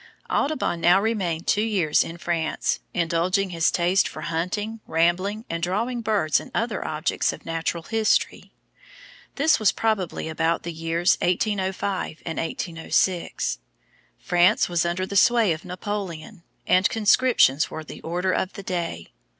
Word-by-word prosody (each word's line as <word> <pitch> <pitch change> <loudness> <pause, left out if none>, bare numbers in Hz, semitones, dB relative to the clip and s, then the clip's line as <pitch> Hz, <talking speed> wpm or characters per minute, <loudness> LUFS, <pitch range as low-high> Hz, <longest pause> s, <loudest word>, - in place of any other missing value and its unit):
Audubon 280 - 0
now 175 +3 +5
remained 195 -7 -1
two 210 - +2
years 195 -9 +2
in 165 - -8
France, 170 -2 -1
indulging 175 +3 0
his 165 -1 +2
taste 180 +2 +2
for 155 - -8
hunting, 185 +8 -3
rambling, 185 +7 +1
and 170 0 -4
drawing 225 +8 -1
birds 205 -10 +1
and - - -10
other - - -1
objects - - -1
of - - -11
Natural 165 0 -2
History. 220 +3 0 0.8
This 295 +1 +3
was 215 - +4
probably 215 -8 -1
about 165 +1 0
the 170 - -5
years 165 +2 +1
1805 190 -2 -1
and 165 - -3
1806. 165 +2 -1 0.6
France 180 - +3
was 170 -1 0
under 180 +2 -1
the 200 - -7
sway 225 0 +4
of 155 - -8
Napoleon, 185 -1 -5 0.2
and 185 +1 +4
conscriptions 220 - +3
were 160 - -6
the - - -10
order 180 +3 -1
of 185 +1 -1
the 200 - -8
day. 170 - -4
180 Hz, 140 wpm, -24 LUFS, 165-205 Hz, 0.8 s, now